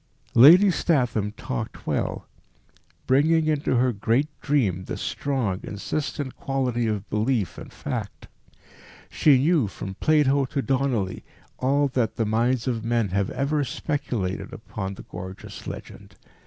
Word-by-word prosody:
Lady 175 - +8
Statham 125 - +1
talked 65 - -5
well, - - -2 0.8
bringing 155 +5 +3
into 150 -4 +1
her 125 0 +2
great 115 +8 +1
dream 100 - +1
this - - -5
strong, 125 -10 -1
insistent 140 +5 -4
quality 125 -4 -1
of 105 -2 -2
belief 110 -1 0
and - - -10
fact. - - -5 0.8
She 145 -4 +5
knew, 145 -2 +3
from 95 0 -7
Plato 140 +2 +3
to 135 +2 -2
Donelly, 130 -8 0 0.4
all 140 +3 +2
that 125 -4 0
the 115 - 0
minds 120 +3 +1
of 115 -3 -1
men 115 -3 +1
have 100 +1 0
ever 145 +2 0
speculated 125 - -3
upon 95 0 -6
the - - -10
gorgeous 95 +1 -9
legend. - - -9
125 Hz, 130 wpm, -25 LUFS, 105-140 Hz, 0.8 s, Lady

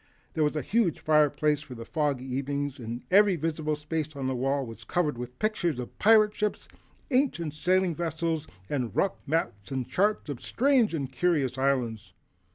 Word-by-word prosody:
There 155 - +1
was 150 +1 +1
a 150 - -1
huge 205 - +1
fireplace 150 -1 +3
for 130 -4 -10
foggy 145 -2 -1
evenings 140 +1 -3
and 120 +1 -6
every 200 0 +6
visible 155 -1 -1
space 150 0 -4
on 135 -1 -4
the 130 - 0
wall 135 +2 0
was 115 -1 -10
covered 150 +3 0
with 125 +1 -7
pictures 195 - 0
of 125 -1 -6
pirate 215 0 +6
ships, 210 -1 -2 0.4
ancient 250 - +1
sailing 185 +3 +2
vessels 165 -1 -2 0.2
and 125 -8 -2
rough 195 - 0
maps 140 -8 -2
and 130 -2 -2
charts 205 0 +1
of 140 -5 -5
strange 250 -7 +2
and 135 -4 -3
curious 140 -4 +1
islands. 130 -5 -1
150 Hz, 165 wpm, -28 LUFS, 130-175 Hz, 0.4 s, every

